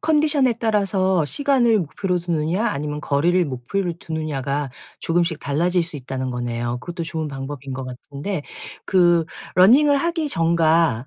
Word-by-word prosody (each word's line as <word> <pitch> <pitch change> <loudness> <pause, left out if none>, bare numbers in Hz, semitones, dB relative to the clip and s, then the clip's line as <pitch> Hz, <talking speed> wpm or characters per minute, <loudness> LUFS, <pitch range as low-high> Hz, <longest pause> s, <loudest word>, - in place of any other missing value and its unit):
컨디션에 295 -5 +3
따라서 195 -6 +1
시간을 245 - +2
목표로 180 +3 -2
두느냐 170 +5 -1
아니면 150 -3 -3
거리를 170 +6 +2
목표로 165 +7 -3
두느냐가 145 -3 -3 0.3
조금씩 170 -1 0
달라질 175 +5 +1
수 165 -2 -4
있다는 130 -1 -4
거네요. 120 0 -3
그것도 175 -1 -6
좋은 160 -1 -4
방법인 135 -1 -6
것 130 0 -5
같은데 145 +7 -6 0.4
그 175 -3 +3 0.3
running을 275 +10 +6
하기 330 0 0
전과 165 - +2
165 Hz, 365 characters per minute, -21 LUFS, 140-195 Hz, 0.4 s, running을